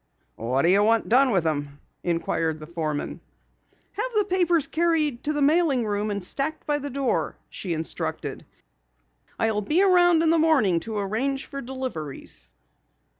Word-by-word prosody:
"What 125 +4 0
do 170 - +4
you 200 +2 +5
want 225 +2 +2
done 260 +3 +5
with 190 -8 +1
'em?" 145 -2 -2 0.2
inquired 165 -2 -1
the 155 - -8
foreman. 155 -3 -4 0.7
"Have - - -3
the 420 - +3
papers 355 -5 +2
carried 315 -6 0
to 300 - +1
the 295 -1 +1
mailing 290 -5 +3
room 205 0 -1
and 200 -2 -3
stacked 285 - -2
by 295 -1 +1
the 285 0 -5
door," 275 -1 -1
she 180 -4 -4
instructed. 160 +1 -3 0.9
"I'll 220 -2 +1
be 310 - +2
around 350 -3 +5
in 325 - +4
the 330 - +3
morning 270 - +3
to 220 - -3
arrange 235 +8 -1
for 275 - -7
deliveries." 165 - -6
245 Hz, 160 wpm, -25 LUFS, -, 0.9 s, you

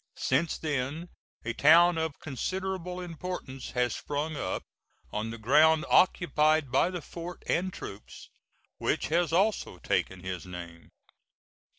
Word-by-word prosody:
Since 150 +5 +1
then 150 +3 -3 0.4
a 120 - -1
town 165 +5 +6
of 160 -2 -3
considerable 180 +5 -3
importance 170 -6 -6
has 125 -4 +1
sprung 150 +2 -3
up - - -3 0.5
on 105 +2 -2
the 115 - -6
ground 155 +8 +4
occupied 155 -5 +3
by 135 +7 +3
the 180 -4 -5
fort 175 +1 -8
and 185 +2 0
troops, 100 - -10 0.5
which - - 0
has 170 +1 +2
also 195 - +1
taken 90 +2 -1
his 90 -3 -4
name. 85 -2 -9
155 Hz, 125 wpm, -29 LUFS, 125-175 Hz, 0.5 s, town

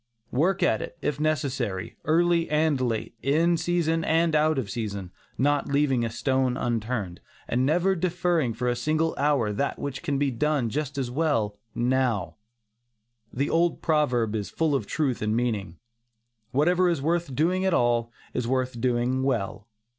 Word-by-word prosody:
Work 175 +9 +1
at - - +2
it, - - -7
if 145 -1 -1
necessary, 130 -10 -1
early 170 +1 +2
and 150 -3 +2
late, 115 -3 -2
in 165 +5 +3
season 165 -1 0
and 165 0 +2
out 155 0 +3
of 130 -6 -1
season, 100 -4 -4 0.3
not 145 +3 +1
leaving 140 -3 +2
a 115 - -1
stone 130 +2 0
unturned, 115 -7 -2 0.3
and 125 +2 +1
never 175 +5 +3
deferring 170 -7 0
for 125 +1 -2
a 120 - +1
single 155 +6 0
hour 140 -7 +2
that 140 +7 -1
which 140 -2 -5
can 145 -5 -1
be 140 -1 +1
done 135 -1 0
just 145 +1 -3
as 130 -3 -2
well 115 -9 0 0.2
now. 120 -6 0 0.9
The 140 +3 -1
old 170 0 +1
proverb 125 -9 +1
is 105 -2 -3
full 160 -2 0
of 115 -7 -1
truth 140 -6 -1
and 105 +1 0
meaning, 105 -8 -2 0.7
"Whatever 175 +6 +3
is 170 -4 0
worth 165 -1 -1
doing 180 +6 +1
at 190 -2 +2
all, 120 -1 +1 0.2
is 125 -2 -2
worth 130 -2 -1
doing 125 +1 +1
well." 105 -6 -2
135 Hz, 160 wpm, -26 LUFS, 120-155 Hz, 0.9 s, in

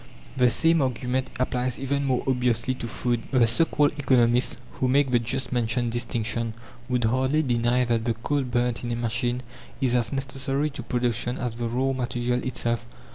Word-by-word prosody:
The 125 -2 +4
same 165 +5 +3
argument 130 0 -1
applies 125 -1 0
even 140 +1 -1
more 130 -2 +1
obviously 125 -1 +1
to 125 -2 -6
food. 120 +1 -1
The 125 -3 +4
so 120 +9 +3
called 145 -2 +2
economists, 125 -3 +3
who 130 - -1
make 135 +1 +3
the 120 - +4
just 125 +3 -2
mentioned 120 0 0
distinction, 115 -1 -2 0.3
would 125 -1 +1
hardly 130 +6 +2
deny 120 -1 +2
that 115 -1 0
the 115 -2 0
coal 145 +5 -1
burnt 125 -2 -1
in 120 - -3
a - - 0
machine 120 +1 -1 0.4
is 130 -3 +1
as 120 -2 +1
necessary 135 +2 -1
to 140 - -6
production 120 0 -1
as 125 -1 -2
the 120 0 -2
raw 130 +3 0
material 125 -1 -1
itself. 120 -2 -1
125 Hz, 180 wpm, -25 LUFS, 120-130 Hz, 0.4 s, The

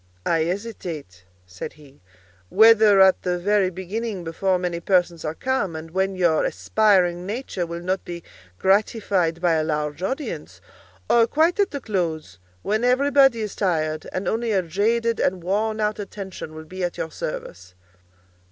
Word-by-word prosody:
"I 165 - +2
hesitate," 170 - -6 0.2
said 90 0 -8
he, 145 -2 -19 0.5
"whether 220 -1 +6
at 190 -1 +5
the 180 0 -1
very 200 +1 +2
beginning, 190 +2 -5
before 185 +3 0
many 175 -1 -3
persons 175 -2 +1
are 155 +1 -3
come, 210 -9 -1
and 160 +1 -8
when 190 +2 0
your 175 -4 +2
aspiring 185 -5 +2
nature 205 -5 -3
will 170 +1 -6
not 185 +2 -2
be 170 -1 -7 0.3
gratified 195 - +1
by 175 -2 +3
a 160 -1 +1
large 150 0 -2
audience, 265 +10 -4 0.5
or 230 -1 +4
quite 320 - +2
at 405 0 +3
the 280 - -5
close, 165 - -3 0.2
when 215 +3 0
everybody 270 -1 +4
is 210 -2 -4
tired, 155 -5 -1
and 185 - -3
only 230 +1 0
a 190 -2 +2
jaded 225 +7 0
and 180 -2 0
worn 215 +4 -1
out 210 0 -1
attention 190 -5 -7
will 155 0 -9
be 185 +3 -6
at 175 - -2
your 160 - -4
service." 90 - -7
185 Hz, 160 wpm, -23 LUFS, 165-215 Hz, 0.5 s, whether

